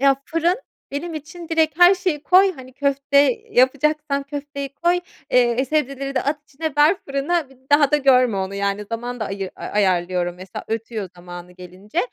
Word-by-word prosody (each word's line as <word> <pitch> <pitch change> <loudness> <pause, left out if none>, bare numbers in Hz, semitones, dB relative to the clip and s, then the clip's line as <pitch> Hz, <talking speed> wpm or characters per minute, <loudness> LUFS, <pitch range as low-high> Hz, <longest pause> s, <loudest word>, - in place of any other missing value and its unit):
Ya, 275 0 +4
fırın 335 +3 +1 0.3
benim 320 +4 -4
için 325 +3 -8
direkt 320 -1 +1
her 355 +2 +8
şeyi 360 -6 -2
koy, 375 +4 +5
hani, 260 -5 -12
köfte 280 0 +1 0.3
yapacaksan 285 +2 +2
köfteyi 280 0 -6
koy, 350 +2 +1 0.3
eee, 245 +1 +3
sebzeleri 275 -1 -2
de - - +1
at 290 +1 -2
içine, 310 +2 -4
ver 300 +6 +5
fırına, 280 +2 -1
bir 270 - -18 0.2
daha 290 -1 +5
da 300 - +4
görme 255 -6 +4
onu, 190 +1 -3
yani. 200 +1 -1
Zaman 240 +3 -5
da 215 - 0
ayı 195 -1 -4
ayarlıyorum, 180 -3 0
mesela 185 +1 -9
ötüyor 225 -2 -4
zamanı 175 0 -10
gelince. 185 - -8
275 Hz, 170 wpm, -21 LUFS, 210-305 Hz, 0.3 s, her